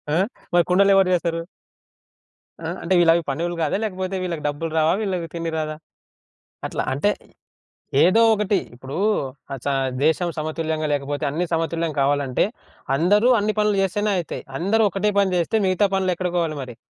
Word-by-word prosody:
ఆ! - - +3 0.4
మరి 175 -1 +5
కుండలెవరు 195 0 +5
చేస్తారు? 165 -1 0 1.2
ఆ! 160 - -5 0.2
అంటే 185 +2 +1
వీళ్ళు 165 -1 +6
అవి 170 - +1
పనోళ్ళు 170 +5 -2
గాదా? 155 +4 +1
లేకపోతే 190 -2 -3
వీళ్ళకి 170 -4 -3
డబ్బులు 155 +3 -4
రావా? 160 +1 +3
వీళ్ళకి 185 -5 -2
తిండి 165 -1 -3
రాదా? 155 0 -3 0.9
అట్లా. - - -3
అంటే 150 +10 +1 0.9
ఏదో 185 +6 +5
ఒకటి. 210 -1 +1 0.2
ఇప్పుడూ 130 +5 -7 0.6
అచ్చా! 135 +2 -2 0.3
దేశం 165 +3 +2
సమతుల్యంగా 155 0 -2
లేకపోతే 145 0 -2
అన్నీ 170 +5 -1
సమతుల్యం 165 0 -1
కావాలంటే 140 -2 +1 0.5
అందరూ 205 - +3
అన్ని 210 +1 -1
పనులు 210 -1 +2
చేస్తేనే 205 +3 0
అయితయి. 170 - -5 0.2
అందరూ 205 +6 +2
ఒకటే 205 +3 0
పని 190 -2 +2
చేస్తే 175 +6 +1
మిగతా 185 +2 +3
పనులు 190 -1 +1
ఎక్కడకోవాలి 170 -3 -1
మరి? 125 -2 -9
170 Hz, 150 wpm, -22 LUFS, 155-190 Hz, 1.2 s, వీళ్ళు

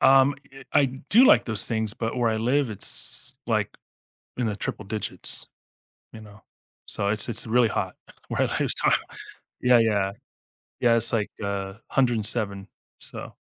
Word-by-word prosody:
Um, 135 +1 +5 0.4
i 140 - +4
do 135 - +2
like 295 +3 +5
those 110 -4 +4
things, 110 -2 -2
but 115 +1 -4
where 120 -2 +1
I 110 - -1
live, 125 +3 0
it's, 105 - +1
like, - - -2 0.6
in 125 - -2
the 105 -2 -3
triple 110 - -5
digits, 110 +1 -3 0.6
you 110 - -11
know, 105 0 -16 0.4
so, 100 - -1
it's 110 +2 +4
it's 115 - +4
really 120 +1 +2
hot - - -3 0.3
where - - -1
I - - +3 0.2
live, - - 0
so - - +3 0.7
yeah 125 -1 +5
yeah 105 -4 +1 0.7
yeah, 120 -1 +3
it's 115 0 +4
like, 110 -3 -1
uh, - - -3 0.3
107, 110 -4 -1 0.3
so - - -8
115 Hz, 155 wpm, -24 LUFS, 105-125 Hz, 0.7 s, Um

